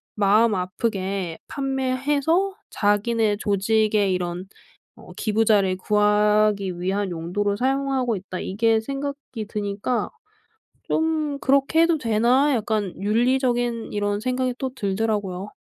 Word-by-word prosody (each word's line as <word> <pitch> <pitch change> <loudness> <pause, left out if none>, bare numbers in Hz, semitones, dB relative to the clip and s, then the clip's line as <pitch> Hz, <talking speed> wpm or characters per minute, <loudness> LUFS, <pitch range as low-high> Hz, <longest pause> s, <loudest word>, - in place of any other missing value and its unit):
마음 210 +2 +3
아프게 185 -2 -2
판매해서 280 +7 0 0.2
자기네 210 +1 +1
조직의 210 0 +1
이런 180 0 -3 0.5
어 - - -14
기부자를 210 -4 +2
구하기 210 -2 +2
위한 195 +1 -1
용도로 190 +5 -2
사용하고 265 -1 0
있다.' 185 0 -7
이게 225 +3 +1
생각이 275 -3 -5
드니까 210 +2 -2 0.8
좀 310 -3 -1
'그렇게 280 +4 +3
해도 335 -1 +3
되나?' 245 +4 +2
약간 215 -4 -1
윤리적인 240 +2 0
이런 205 0 -1
생각이 255 +1 -1
또 265 - -2
들더라고요. 200 -3 -2
215 Hz, 265 characters per minute, -23 LUFS, 200-255 Hz, 0.8 s, 마음